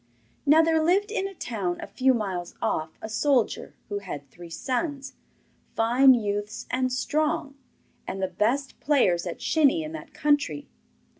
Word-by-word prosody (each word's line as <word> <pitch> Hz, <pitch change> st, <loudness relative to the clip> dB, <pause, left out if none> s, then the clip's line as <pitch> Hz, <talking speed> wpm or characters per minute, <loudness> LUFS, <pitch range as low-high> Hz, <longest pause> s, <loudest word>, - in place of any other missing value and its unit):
Now 315 Hz, +3 st, +7 dB
there 320 Hz, 0 st, +3 dB
lived 390 Hz, +6 st, +2 dB
in 390 Hz, -4 st, -1 dB
a 390 Hz, -, -10 dB
town 195 Hz, -, -3 dB
a -, -, -5 dB
few 260 Hz, 0 st, +2 dB
miles 185 Hz, -6 st, -4 dB
off 160 Hz, 0 st, -2 dB
a -, -, -3 dB
soldier 245 Hz, +2 st, 0 dB
who 205 Hz, -1 st, -3 dB
had 145 Hz, -8 st, -8 dB
three 175 Hz, 0 st, -11 dB
sons, 270 Hz, -, -3 dB, 0.6 s
fine 250 Hz, +4 st, +6 dB
youths 205 Hz, -1 st, -3 dB
and 255 Hz, 0 st, 0 dB
strong, 285 Hz, +2 st, 0 dB, 0.5 s
and 195 Hz, -, -4 dB
the 190 Hz, -, 0 dB
best 255 Hz, +8 st, -1 dB
players 190 Hz, -, +2 dB
at 170 Hz, -, -6 dB
shinny 315 Hz, +1 st, +3 dB
in 310 Hz, -, -6 dB
that 320 Hz, -, -8 dB
country. 290 Hz, -1 st, 0 dB
255 Hz, 155 wpm, -26 LUFS, 205-295 Hz, 0.6 s, Now